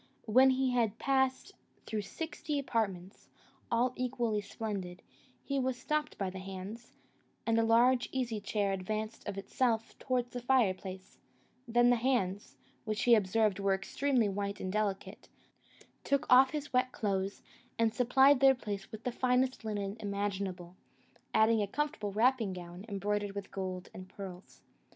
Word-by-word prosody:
When 255 Hz, +4 st, +6 dB
he 260 Hz, 0 st, +2 dB
had 230 Hz, -4 st, +1 dB
passed 265 Hz, -1 st, +1 dB, 0.3 s
through 215 Hz, -1 st, -2 dB
sixty 295 Hz, +7 st, -4 dB
apartments, 200 Hz, -8 st, -3 dB, 0.4 s
all 245 Hz, +2 st, +2 dB
equally 240 Hz, -4 st, -1 dB
splendid, 200 Hz, -3 st, -5 dB, 0.4 s
he 275 Hz, -1 st, -1 dB
was 260 Hz, -1 st, -1 dB
stopped 300 Hz, +3 st, -2 dB
by 190 Hz, -2 st, -2 dB
the 190 Hz, -, -7 dB
hands, 195 Hz, +5 st, -8 dB, 0.5 s
and 230 Hz, 0 st, +2 dB
a -, -, +3 dB
large 240 Hz, +2 st, +4 dB
easy 240 Hz, -5 st, -2 dB
chair 205 Hz, -1 st, 0 dB
advanced 215 Hz, +4 st, -4 dB
of 200 Hz, -1 st, -4 dB
itself 225 Hz, +3 st, -1 dB
towards 250 Hz, -2 st, -1 dB
the 245 Hz, -, -5 dB
fireplace; 190 Hz, -7 st, 0 dB, 0.5 s
then 240 Hz, +1 st, +4 dB
the 245 Hz, -, +4 dB
hands, 225 Hz, -6 st, -1 dB, 0.3 s
which 215 Hz, -2 st, -2 dB
he 240 Hz, -, +6 dB
observed 210 Hz, -1 st, +3 dB
were 195 Hz, -1 st, +2 dB
extremely 250 Hz, +4 st, 0 dB
white 200 Hz, 0 st, -3 dB
and 185 Hz, 0 st, -4 dB
delicate, 210 Hz, -2 st, -3 dB, 0.7 s
took 280 Hz, +2 st, +1 dB
off 260 Hz, +1 st, +8 dB
his 295 Hz, 0 st, -5 dB
wet 255 Hz, 0 st, +2 dB
clothes, 195 Hz, -3 st, -2 dB, 0.3 s
and 225 Hz, -1 st, +2 dB
supplied 265 Hz, +3 st, +5 dB
their 270 Hz, 0 st, +6 dB
place 205 Hz, -5 st, -6 dB
with 220 Hz, +1 st, -8 dB
the 250 Hz, -, -1 dB
finest 255 Hz, +1 st, +1 dB
linen 205 Hz, -1 st, -3 dB
imaginable, 200 Hz, -3 st, -3 dB, 0.6 s
adding 220 Hz, 0 st, +4 dB
a 205 Hz, -, 0 dB
comfortable 290 Hz, -4 st, -2 dB
wrapping 225 Hz, -1 st, +2 dB
gown, 180 Hz, +2 st, -9 dB
embroidered 205 Hz, 0 st, -2 dB
with 200 Hz, -1 st, -6 dB
gold 185 Hz, -1 st, -5 dB
and 185 Hz, 0 st, -10 dB
pearls. 190 Hz, -2 st, -10 dB
220 Hz, 150 wpm, -32 LUFS, 195-250 Hz, 0.7 s, off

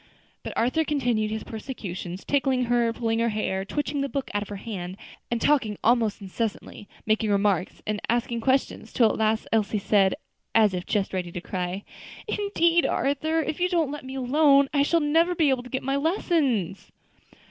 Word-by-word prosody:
But -, -, -6 dB
Arthur 255 Hz, +8 st, +2 dB
continued 245 Hz, -8 st, 0 dB
his 220 Hz, 0 st, -4 dB
persecutions 195 Hz, -6 st, -6 dB
tickling 265 Hz, -2 st, +1 dB
her, 240 Hz, -1 st, +2 dB
pulling 225 Hz, -1 st, -1 dB
her 235 Hz, 0 st, +2 dB
hair, 200 Hz, -3 st, -1 dB
twitching 290 Hz, +6 st, -2 dB
the 275 Hz, -, -1 dB
book 275 Hz, -1 st, -3 dB
out 205 Hz, -, 0 dB
of 205 Hz, -, -7 dB
her 205 Hz, -, -5 dB
hand, 190 Hz, -3 st, -6 dB, 0.3 s
and 235 Hz, -, -1 dB
talking 225 Hz, -7 st, +2 dB
almost 225 Hz, -3 st, +2 dB
incessantly, 205 Hz, +1 st, -5 dB, 0.2 s
making 215 Hz, 0 st, +1 dB
remarks, 200 Hz, -3 st, 0 dB
and 210 Hz, -1 st, -2 dB
asking 235 Hz, 0 st, 0 dB
questions; 265 Hz, +3 st, 0 dB
till 230 Hz, -3 st, +4 dB
at -, -, -4 dB
last 220 Hz, 0 st, +1 dB
Elsie 215 Hz, -1 st, +1 dB
said, 195 Hz, -1 st, +3 dB, 0.4 s
as 215 Hz, -3 st, +5 dB
if 180 Hz, -1 st, -4 dB
just 205 Hz, -4 st, -1 dB
ready 180 Hz, -2 st, -3 dB
to 175 Hz, -, -5 dB
cry, 180 Hz, +2 st, -4 dB, 0.4 s
"Indeed, 345 Hz, -5 st, +2 dB
Arthur, 315 Hz, +4 st, 0 dB
if 310 Hz, -, -4 dB
you 360 Hz, +1 st, +2 dB
don't 330 Hz, -6 st, +1 dB
let 295 Hz, -1 st, -6 dB
me 260 Hz, +1 st, -7 dB
alone, 275 Hz, +1 st, +4 dB
I 285 Hz, -, +3 dB
shall 330 Hz, +4 st, +2 dB
never 330 Hz, +4 st, +2 dB
be 315 Hz, -4 st, +3 dB
able 260 Hz, -2 st, 0 dB
to 250 Hz, -, -12 dB
get 260 Hz, +1 st, -3 dB
my 270 Hz, +1 st, 0 dB
lessons." 280 Hz, -, 0 dB
235 Hz, 185 wpm, -25 LUFS, 205-280 Hz, 0.4 s, as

